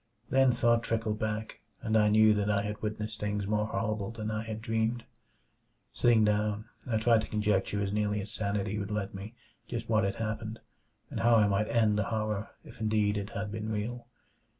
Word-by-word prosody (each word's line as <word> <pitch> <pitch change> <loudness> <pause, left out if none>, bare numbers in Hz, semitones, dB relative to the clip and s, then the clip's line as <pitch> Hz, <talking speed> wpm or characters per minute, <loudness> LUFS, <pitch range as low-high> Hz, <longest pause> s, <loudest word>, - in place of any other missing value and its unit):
Then 135 0 +5
thought 120 -1 +3
trickled 110 -2 -1
back, 110 0 -3 0.2
and 110 -1 0
I 105 -1 +5
knew 110 0 +6
that 105 0 0
I 100 -1 +2
had 105 0 -4
witnessed 105 0 -3
things 105 -1 -1
more 105 +1 0
horrible 110 -2 -2
than 110 -2 -4
I 110 0 -1
had 110 -1 -5
dreamed. 115 +1 -1 0.9
Sitting 115 -2 +4
down, 105 0 0 0.2
I 115 -3 +1
tried 115 0 +4
to - - -5
conjecture 105 -1 0
as 100 0 -2
nearly 105 0 0
as 100 +1 -6
sanity 100 0 -1
would 100 0 -4
let 105 -2 -2
me 100 +4 -8 0.3
just 115 -1 -5
what 110 -2 +3
had 100 0 0
happened, 110 0 -4 0.5
and - - -3
how 120 0 +5
I 110 -2 +6
might 100 +1 +1
end 110 -3 +3
the 105 - +1
horror, 110 -1 -2
if - - -13
indeed 105 -1 +2
it 100 0 -3
had 105 -1 -4
been 110 0 -4
real. 115 +3 -3
110 Hz, 195 wpm, -30 LUFS, 105-110 Hz, 0.9 s, knew